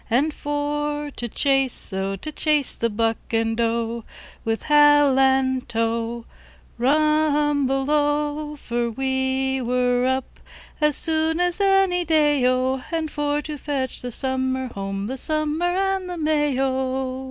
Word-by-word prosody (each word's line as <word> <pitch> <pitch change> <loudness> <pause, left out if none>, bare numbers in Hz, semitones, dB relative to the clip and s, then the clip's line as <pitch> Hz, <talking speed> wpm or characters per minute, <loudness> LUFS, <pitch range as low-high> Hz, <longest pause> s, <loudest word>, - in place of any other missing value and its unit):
And 280 +7 +1
for 295 0 -3
to 240 - -6
chase, 270 -3 0
O! 195 +1 -2
To 305 +11 -7
chase 300 -3 +1
the 230 - -1
buck 225 +1 0
and 225 0 0
doe. 230 0 -1 0.4
With 225 0 -2
Halantow, 260 -5 +2 0.5
Rumble 295 -1 +2
Ow! 295 0 0
For 240 -4 -2
we 265 +1 -1
were 250 0 +1
up 260 0 -3 0.4
as 300 -2 +3
soon 320 0 +3
as 355 +2 +1
any 390 -2 +3
day, 300 -4 +2
O! 255 +1 +1
And 320 -2 -2
for 295 0 -1
to 300 -2 -6
fetch 270 -3 -3
the 245 - -5
Summer 260 0 -1
home, 195 0 -4
The 260 +5 -4
Summer 310 +4 -1
and 380 +1 -1
the 355 - -5
May, 300 -3 +1
O! 260 -1 -1
270 Hz, 130 wpm, -22 LUFS, 250-300 Hz, 0.5 s, as